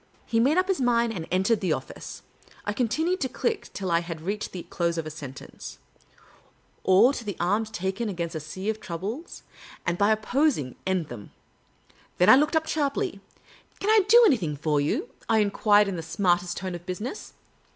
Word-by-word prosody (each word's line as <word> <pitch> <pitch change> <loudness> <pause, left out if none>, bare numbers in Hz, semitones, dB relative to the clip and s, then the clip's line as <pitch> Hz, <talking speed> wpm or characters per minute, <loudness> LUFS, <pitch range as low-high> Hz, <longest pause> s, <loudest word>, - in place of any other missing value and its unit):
He 230 - +1
made 275 +8 +3
up 370 0 +3
his 385 -7 0
mind, 235 -2 +2
and 165 -5 -5
entered 190 +5 +2
the 180 -5 +1
office. 130 - -7 0.4
I 205 - -1
continued 315 - 0
to 260 - 0
click 250 0 -2
till 190 -3 -4
I 170 - +4
had 170 -1 -6
reached 200 +5 -3
the 180 - -6
close 170 -1 -2
of 165 - -2
a 155 - -5
sentence 140 -4 -9 0.4
— - - -28
" - - -38
Or 205 +8 +5
to 240 - -5
take 205 -5 -5
arms 205 +5 +1
against 190 -3 -2
a 160 - -3
sea 175 +6 -7
of 220 - -8
troubles, 205 - -6 0.4
and 170 0 -1
by 205 +1 +4
opposing, 220 - +1
end 185 -4 0
them." 110 -4 -9 0.9
Then 180 - +5
I - - +10
looke 300 +4 +3
^ - - 0
up 320 0 +2
sharply. 310 +6 -1 0.6
"Can 415 - +1
I 435 -2 +6
do 475 +3 +8
anything 180 - +2
for 150 -1 +1
you? 245 - -1
" - - -26
I 225 - +4
enquired, 205 0 +4
in 190 -2 -3
the - - -3
smartest 175 +2 0
tone 185 -1 -4
of 175 +1 -8
business. 210 - -5
200 Hz, 200 wpm, -26 LUFS, 170-245 Hz, 0.9 s, I